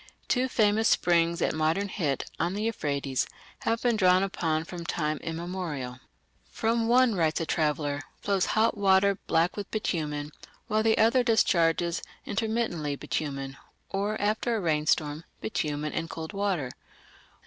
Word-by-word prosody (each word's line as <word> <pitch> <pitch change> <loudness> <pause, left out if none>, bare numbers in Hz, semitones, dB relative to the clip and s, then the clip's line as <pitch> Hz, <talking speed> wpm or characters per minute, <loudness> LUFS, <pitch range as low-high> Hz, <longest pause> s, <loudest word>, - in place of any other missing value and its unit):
Two 255 0 +2
famous 220 -2 +3
springs 170 -1 +3
at - - +1
modern 160 +6 +1
Hit, 150 - -1
on 175 +3 0
the 210 - -2
Euphrates, 140 - -1 0.3
have 230 0 -1
been 240 -2 +3
drawn 185 -2 +4
upon 160 -5 -1
from 170 +1 -7
time 155 -2 -1
immemorial. 165 -6 -4 0.5
"From 225 0 0
one", 250 0 +5
writes 160 -4 +1
a 165 - -1
traveller, 150 -2 0 0.2
"flows 195 -2 +1
hot 225 +2 +3
water 195 0 +3
black 165 +2 +2
with 205 -1 -5
bitumen, 150 -8 -2 0.3
while 215 +1 +1
the 220 0 +3
other 230 +4 +5
discharges 170 -7 +2 0.2
intermittently 215 -9 -1
bitumen, 135 -2 -4 0.3
or, 205 +2 -1
after 220 +3 0
a - - 0
rainstorm, 155 -2 +1 0.2
bitumen 150 -7 -2
and 165 0 -3
cold 160 +4 -6
water.... 190 -10 -1
175 Hz, 140 wpm, -28 LUFS, 155-215 Hz, 0.5 s, one